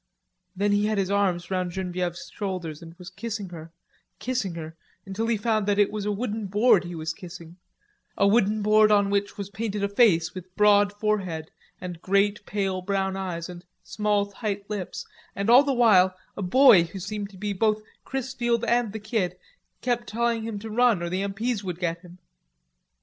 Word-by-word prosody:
Then 200 +2 +1
he 205 +1 +2
had 215 -1 0
his 195 -1 0
arms 190 -3 0
round 185 -1 0
Genevieve's 180 -2 -4
shoulders 180 -6 -4
and 165 0 -11
was 180 +1 -11
kissing 205 0 -5
her, 165 -1 -10 0.5
kissing 240 -8 -2
her, 160 -1 -7 0.3
until 200 +4 -3
he 230 -1 +1
found 215 -1 0
that 205 -1 +2
it 205 -1 +3
was 210 -1 -4
a - - +1
wooden 210 0 -3
board 205 -1 +4
he 175 0 -6
was 160 0 -3
kissing, 170 -1 -11 0.6
a 200 - +4
wooden 210 0 +2
board 215 0 +5
on 200 -1 +3
which 200 0 -1
was 200 -1 -6
painted 210 -1 -3
a - - +2
face 200 -6 +3
with 185 0 -10
broad 205 -1 +5
forehead 200 -7 -2 0.3
and 175 -2 -7
great 200 +2 +1
pale 195 -2 -1
brown 190 0 -1
eyes, 180 -3 -4
and 175 -1 -10 0.2
small 210 -1 0
tight 200 0 -5
lips, 200 -4 -4 0.3
and 200 +3 +1
all 250 +3 +9
the 285 -1 0
while 200 -7 +5 0.2
a - - -5
boy 195 -2 +6
who 170 - -9
seemed 200 +2 -5
to 195 - -15
be 205 +1 -3
both 215 +2 +1 0.2
Chrisfield 240 -3 -1
and 235 -3 +1
the 220 - -4
Kid 215 -4 -2 0.4
kept 240 -1 -1
telling 235 0 0
him 220 -1 -4
to 220 +2 -7
run 230 -5 +3
or 170 - -2
the 185 +1 -1
M.P.'s 205 +3 -2
would 180 -3 -4
get 170 -2 -2
him. 180 -1 -14
200 Hz, 190 wpm, -25 LUFS, 185-215 Hz, 0.6 s, all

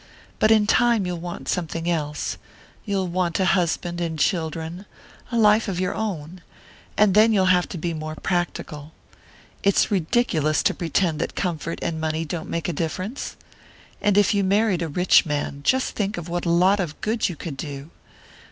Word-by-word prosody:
"But 215 - +4
in 215 -1 +5
time 235 -2 +3
you'll 180 -1 -3
want 175 +1 -7
something 165 -1 -2
else; 150 -3 -2 0.5
you'll 195 -3 -1
want 175 0 -1
a 190 - +2
husband 175 -1 0
and 165 -2 -2
children 165 +2 -2 0.4
a 235 - 0
life 215 0 +4
of 185 -3 -2
your 185 -1 0
own. 180 -5 -4 0.6
And 210 -2 +5
then 215 +3 +6
you'll 195 -3 +3
have 180 -1 +1
to - - -5
be 170 +1 -2
more 155 0 -5
practical. 160 -4 -3 0.7
It's 200 +1 +3
ridiculous 165 - +1
to - - +3
pretend 165 -1 0
that - - -3
comfort 165 -2 -2
and 160 -2 -2
money 160 +1 -1
don't 160 +1 -5
make 170 -1 -2
a 175 - -1
difference. 185 - -4 0.7
And 205 -1 +2
if 205 -1 +4
you 200 -1 +2
married 200 -1 +2
a 165 - -1
rich 180 +4 +4
man, 145 -2 -3
just 260 - +2
think 205 0 -1
what 175 +1 -3
a - - +2
lot 185 +4 +4
of 165 -5 -3
good 220 -1 0
you 175 - -5
could 155 -1 -6
do! 140 +2 -7
175 Hz, 180 wpm, -23 LUFS, 160-200 Hz, 0.7 s, then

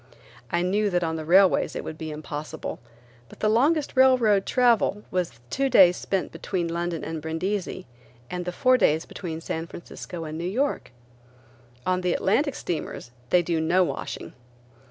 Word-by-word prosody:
I 170 0 +1
knew 205 +3 +1
that 175 -2 +1
on 160 -1 -1
the 160 -1 -5
railways 185 +3 +4
it - - -4
would 155 - -7
be 160 - -5
impossible, 150 0 -6 0.5
but - - -15
the 215 - +1
longest 280 +9 +2
railroad 250 -7 +4
travel 235 -5 +3
was 180 -2 0
the 120 -2 -22
two 275 0 +1
days 185 -7 +7
spent 190 0 -2
between 180 -3 -3
London 170 0 -3
and 160 -1 -4
Brindisi, 180 +4 -3 0.4
and 180 +4 -4
the 180 - -2
four 255 +7 +3
days 160 -5 +3
between 165 -3 -6
San 165 0 -4
Francisco 170 0 -8
and 155 0 -6
New - - -4
York. 270 +9 -1 1.0
On 185 0 +1
the 180 -1 +1
Atlantic 280 +8 +1
steamers 155 -7 -5 0.2
they 180 -1 +4
do 165 -1 0
no 175 +4 +3
washing. - - -5
180 Hz, 170 wpm, -25 LUFS, 165-210 Hz, 1.0 s, days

